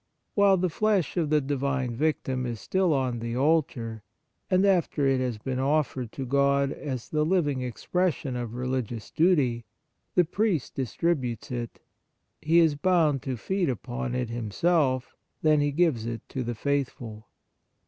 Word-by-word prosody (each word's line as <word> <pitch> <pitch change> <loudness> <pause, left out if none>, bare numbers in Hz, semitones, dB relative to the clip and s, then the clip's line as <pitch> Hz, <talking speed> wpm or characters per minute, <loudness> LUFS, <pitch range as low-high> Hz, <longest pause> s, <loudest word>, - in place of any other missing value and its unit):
While 200 -2 +5
the 185 +1 +1
flesh 210 -2 +1
of 165 -4 0
the 155 0 +4
Divine 135 -3 -1
Victim 130 -3 -1
is 115 -2 -4
still 185 - +1
on 130 -4 0
the 115 +1 -3
altar, 130 -7 0 0.5
and 185 +2 +3
after 175 -6 +2
it 135 -1 +3
has 125 -3 -1
been 130 +4 -3
offered 135 -4 0
to 135 - -4
God 140 +1 +2
as 130 -6 -5
the 150 0 +1
living 150 -6 +1
expression 140 +3 -1
of 120 -2 -4
re 125 +1 -3
ligious 120 -4 -3
duty, 145 -9 +2 0.5
the 180 - +5
priest 185 - 0
distributes 135 - -2
it. 120 -2 -5 0.6
He 160 +2 +3
is 165 -3 +5
bound 155 -3 +2
to 130 -2 -3
feed 190 - -1
upon 125 +1 -3
it 125 -2 -2
himself; 130 - 0 0.3
then 155 -1 +4
he 145 0 +1
gives 140 -8 +1
it 115 -1 -5
to 130 - -3
the 120 0 -3
faithful. 120 -5 -3
135 Hz, 160 wpm, -27 LUFS, 125-160 Hz, 0.6 s, While